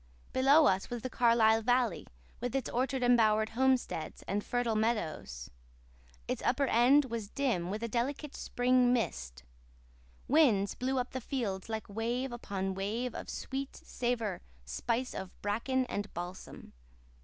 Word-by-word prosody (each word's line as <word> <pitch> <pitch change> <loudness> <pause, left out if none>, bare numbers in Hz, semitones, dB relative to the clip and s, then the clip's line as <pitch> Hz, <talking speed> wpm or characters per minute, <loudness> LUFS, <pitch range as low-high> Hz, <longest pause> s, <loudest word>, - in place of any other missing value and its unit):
Below 280 +4 +6
us 190 -5 +2
was 240 -2 -5
the 255 - -4
Carlisle 225 -2 +4
valley, 245 -3 +1 0.3
with 245 +1 -3
its 270 - -1
orchard 260 +1 0
embowered 220 -3 +4
homesteads, 255 -8 0
and 205 +1 -2
fertile 245 -2 0
meadows. 165 - -2 0.8
Its - - -2
upper 275 +3 +2
end 265 +4 +5
was 230 -4 -5
dim 230 -12 -1
with 210 +4 -4
a - - 0
delicate 270 +6 -2
spring 250 0 +2
mist. 65 - -2 0.8
Winds 240 -10 +4
blew 260 +1 -1
up 250 0 -1
the 260 - -4
field 220 -7 -3
like 220 -1 -4
wave 235 +5 -2
upon 195 -5 -3
wave 220 +6 -2
of - - -7
sweet 270 +1 -4
savour 235 -6 -2 0.2
spice 230 - -2
of 190 -1 -7
bracken 245 +6 0
and 205 -4 -4
balsam. 175 +2 -8
235 Hz, 145 wpm, -32 LUFS, 205-255 Hz, 0.8 s, Below